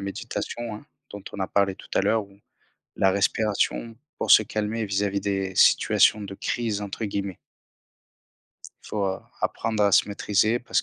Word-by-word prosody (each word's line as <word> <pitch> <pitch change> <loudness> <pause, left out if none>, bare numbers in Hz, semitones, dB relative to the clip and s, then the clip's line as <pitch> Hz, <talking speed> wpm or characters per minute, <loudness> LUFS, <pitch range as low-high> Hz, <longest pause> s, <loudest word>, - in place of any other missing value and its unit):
méditation, 105 +3 -5
hein, 110 - -11 0.2
dont 100 -1 -9
on 100 - -7
a 95 - 0
parlé 100 -1 +1
tout - - -15
à - - +4
l'heure 110 -2 +1
ou 100 0 -21 0.6
la 95 -1 +3
respiration 105 +3 0 0.2
pour - - +1
se 110 - +8
calmer 110 +1 -2
vis-à-vis 100 0 -1
des 95 -2 -2
situations 105 - +4
de 100 -1 -7
«crise», 110 -2 -2
entre 100 +2 -4
guillemets 100 -2 -4 1.5
il - - -12
faut, 105 -2 -1
heu, 95 0 -2 0.2
apprendre 110 -2 -1
à 100 - +3
se - - +5
maîtriser 105 +3 +1
parce 120 - -1
100 Hz, 165 wpm, -25 LUFS, 100-110 Hz, 1.5 s, se